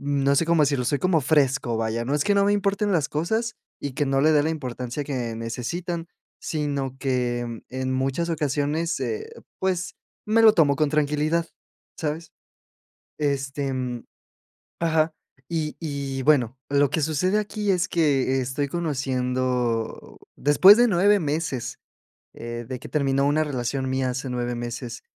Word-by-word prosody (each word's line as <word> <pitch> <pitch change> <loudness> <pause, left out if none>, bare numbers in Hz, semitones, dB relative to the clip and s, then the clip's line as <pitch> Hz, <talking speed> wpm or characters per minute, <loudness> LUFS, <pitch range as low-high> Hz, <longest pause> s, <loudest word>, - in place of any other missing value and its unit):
no 140 0 +1
sé 165 - +2
cómo 170 -2 +4
decirlo. 140 -3 +1
Soy 145 +3 +1
como 185 -3 +3
fresco, 135 -4 +2
vaya, 115 +1 -1
no 140 +4 -1
es 150 - +2
que 205 - +3
no 200 - +4
me 205 - +3
importen 200 0 +1
las 155 -5 +1
cosas 220 +10 -1 0.2
y 140 - -4
que 145 - 0
no 135 0 +2
le 155 +3 +4
dé 150 -1 +4
la 160 - +1
importancia 130 -3 -4
que 125 -5 -3
necesitan, 165 +10 -4 0.3
sino 140 -4 -2
que 120 -3 -2
en 130 0 -3
muchas 135 +6 -1
ocasiones, 150 +2 -1
eh, 435 0 -3 0.3
pues, 185 -1 -1 0.3
me 225 +2 +3
lo 220 -1 +8
tomo 145 -7 +3
con 155 0 +2
tranquilidad, 150 +2 +1 0.5
¿sabes? 155 +1 -4 0.9
Este, 140 -1 -1
mm, 125 -2 -3 0.8
Ajá. 160 -1 +2 0.4
Y 160 -3 -2
y 140 -4 -3
bueno, 130 -4 +3
lo 140 0 +3
que 155 - 0
sucede 160 +7 +1
aquí 210 -1 -1
es 185 -1 +1
que 135 -5 +2
estoy 135 +3 -2
conociendo, 130 -6 -2 0.2
después 185 +9 +7
de 245 0 +5
9 205 +1 +4
meses, 150 -5 -2 0.5
eh, 120 0 -6
de 130 0 -5
que - - -10
terminó 140 -2 +1
una 155 +2 +2
relación 130 -2 -2
mía, 130 -1 0
hace 130 +1 -4
9 120 0 -2
meses, 120 0 -6
145 Hz, 155 wpm, -24 LUFS, 130-165 Hz, 0.9 s, lo